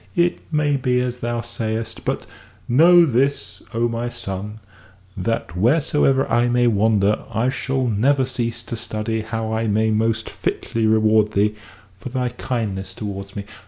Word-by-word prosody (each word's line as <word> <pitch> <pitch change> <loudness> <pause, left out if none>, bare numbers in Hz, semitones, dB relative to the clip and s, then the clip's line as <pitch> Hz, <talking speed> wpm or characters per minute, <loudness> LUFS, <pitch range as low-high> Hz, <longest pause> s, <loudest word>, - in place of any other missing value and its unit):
"It 175 0 +2
may 150 -2 +2
be 125 -1 +1
as 125 0 -2
thou 120 -1 -2
sayest. 115 -1 -4
But - - -2 0.4
know 170 +7 +7
this, 135 +1 0
O 115 0 +1
my 120 +1 -3
son, 105 -2 -6 0.6
that 95 -2 -2
wheresoever 135 - +2
I 120 +1 +2
may 120 0 +3
wander, 105 -2 +3
I 120 +3 +1
shall 135 0 -1
never 130 +5 +2
cease 115 -2 -3
to 115 - -5
study 110 0 -3
how 110 0 -3
I 110 0 0
may 110 +1 +2
most 110 +1 0
fitly 115 -1 -2
reward 110 -1 +3
thee 105 +2 +2 0.5
for 100 - -6
thy 125 0 -1
kindness 100 -5 -4
towards 100 -2 -6
me. 100 - -5
115 Hz, 155 wpm, -21 LUFS, 110-125 Hz, 0.6 s, know